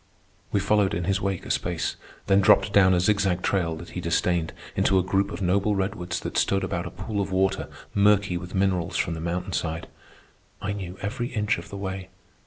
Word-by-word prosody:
We 100 Hz, -, +2 dB
followed 100 Hz, 0 st, +2 dB
in 85 Hz, -, -2 dB
his 100 Hz, +2 st, 0 dB
wake 95 Hz, -2 st, -2 dB
a -, -, -3 dB
space, -, -, -1 dB, 0.3 s
then 100 Hz, 0 st, +4 dB
dropped 100 Hz, +1 st, +5 dB
down 95 Hz, -2 st, +6 dB
a -, -, +3 dB
zigzag 95 Hz, -1 st, +2 dB
trail 85 Hz, -4 st, +1 dB
that 85 Hz, +2 st, -9 dB
he 90 Hz, -, -4 dB
disdained 85 Hz, 0 st, +1 dB, 0.2 s
into 95 Hz, -, +3 dB
a 95 Hz, -, +3 dB
group 95 Hz, +2 st, +1 dB
of 100 Hz, -, -5 dB
noble 100 Hz, +3 st, +2 dB
redwoods 95 Hz, -2 st, -2 dB
that -, -, -1 dB
stood 95 Hz, 0 st, +1 dB
about -, -, -2 dB
a -, -, -4 dB
pool 105 Hz, -2 st, -3 dB
of 95 Hz, -1 st, -3 dB
water 95 Hz, +1 st, +1 dB, 0.2 s
murky 100 Hz, -2 st, +4 dB
with 90 Hz, +2 st, -5 dB
minerals 95 Hz, -3 st, +1 dB
from 85 Hz, -, 0 dB
the 80 Hz, -, -5 dB
mountain 90 Hz, +2 st, -3 dB
side. 80 Hz, 0 st, -2 dB, 0.7 s
I 100 Hz, 0 st, -2 dB
knew 95 Hz, -2 st, -6 dB
every 115 Hz, +4 st, -2 dB
inch 105 Hz, -3 st, 0 dB
of -, -, -11 dB
the 100 Hz, -, -7 dB
way. 95 Hz, -1 st, -5 dB
95 Hz, 205 wpm, -26 LUFS, 90-100 Hz, 0.7 s, down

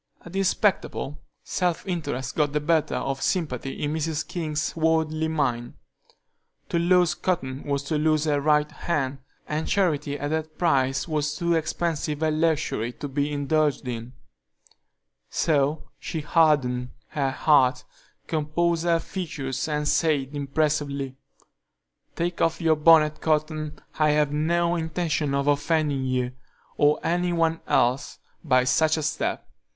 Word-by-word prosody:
At 175 Hz, -, -10 dB
this 195 Hz, -1 st, +2 dB
spectacle, 185 Hz, -7 st, -1 dB, 0.2 s
self 180 Hz, -2 st, -1 dB
interest 140 Hz, -8 st, -3 dB
got 145 Hz, -2 st, +1 dB
the 150 Hz, -, +2 dB
better 155 Hz, 0 st, +1 dB
of 135 Hz, +2 st, -2 dB
sympathy 140 Hz, -8 st, -2 dB
in 145 Hz, +1 st, -1 dB
Mrs. 160 Hz, -1 st, -2 dB
King's 155 Hz, -3 st, -3 dB
worldly 160 Hz, -1 st, +1 dB
mind. 125 Hz, -7 st, -1 dB, 0.9 s
To 170 Hz, -, +1 dB
lose 175 Hz, -1 st, +4 dB
Cotton 140 Hz, -8 st, -2 dB
was 140 Hz, -1 st, -1 dB
to 150 Hz, +2 st, -1 dB
lose 155 Hz, 0 st, +2 dB
her 145 Hz, -2 st, +1 dB
right 150 Hz, 0 st, +2 dB
hand, 140 Hz, -5 st, -2 dB, 0.3 s
and 155 Hz, +1 st, -2 dB
charity 150 Hz, -7 st, +1 dB
at 145 Hz, +1 st, -3 dB
that 155 Hz, 0 st, -3 dB
price 135 Hz, -5 st, +1 dB
was 150 Hz, -1 st, -1 dB
too 170 Hz, +2 st, 0 dB
expensive 160 Hz, -1 st, -1 dB
a 155 Hz, -, +2 dB
luxury 155 Hz, -7 st, 0 dB
to 145 Hz, -, -6 dB
be 145 Hz, +2 st, -1 dB
indulged 145 Hz, -1 st, 0 dB
in; 120 Hz, 0 st, -5 dB, 1.2 s
so 150 Hz, 0 st, 0 dB
she 160 Hz, -, -4 dB
hardened 145 Hz, -6 st, +2 dB, 0.2 s
her 140 Hz, -3 st, 0 dB
heart, 130 Hz, -2 st, +3 dB, 0.4 s
composed 165 Hz, +2 st, 0 dB
her 170 Hz, -1 st, +4 dB
features, 150 Hz, -7 st, -4 dB
and 150 Hz, -1 st, -1 dB
said, 150 Hz, -5 st, +1 dB
impressively: 140 Hz, -1 st, -1 dB, 1.0 s
"Take 170 Hz, +1 st, -2 dB
off 165 Hz, -, +2 dB
your 165 Hz, -2 st, +3 dB
bonnet, 155 Hz, -1 st, +5 dB
Cotton; 155 Hz, -1 st, -1 dB, 0.2 s
I 155 Hz, 0 st, +4 dB
have 150 Hz, -1 st, +2 dB
no 170 Hz, +3 st, +1 dB
intention 160 Hz, -3 st, -1 dB
of 140 Hz, 0 st, 0 dB
offending 145 Hz, -1 st, +1 dB
you, 125 Hz, -1 st, 0 dB, 0.4 s
or 150 Hz, 0 st, +3 dB
any 175 Hz, +2 st, +1 dB
one 165 Hz, -1 st, +1 dB
else, 130 Hz, +4 st, +1 dB, 0.3 s
by 130 Hz, 0 st, +3 dB
such 155 Hz, +5 st, +2 dB
a 155 Hz, -, -2 dB
step. 150 Hz, -, -2 dB
150 Hz, 140 wpm, -25 LUFS, 140-160 Hz, 1.2 s, bonnet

